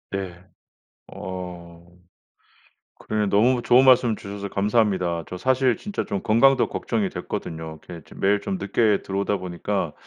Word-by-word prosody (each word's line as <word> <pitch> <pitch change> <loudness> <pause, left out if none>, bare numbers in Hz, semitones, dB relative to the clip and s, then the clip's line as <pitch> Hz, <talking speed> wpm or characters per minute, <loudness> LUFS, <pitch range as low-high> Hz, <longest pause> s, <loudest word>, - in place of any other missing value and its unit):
예. 90 -3 -5 0.7
어. 90 -2 -8 1.1
그러네 105 -1 -1
너무 120 +6 +3
좋은 125 +3 +5
말씀 125 -3 +5
주셔서 100 0 -7
감사합니다. 100 -5 +1
저 90 - -6
사실 130 +2 +2
진짜 205 -1 -4
좀 100 - -3
건강도 130 +4 +4
걱정이 205 -3 -2
됐거든요. 80 - -6
이렇게 85 -3 -8
좀 - - -13
매일 100 +1 +3
좀 195 - -3
늦게 110 -9 +1
들어오다 100 +1 -1
보니까 90 -2 -3
100 Hz, 305 characters per minute, -23 LUFS, 90-120 Hz, 1.1 s, 좋은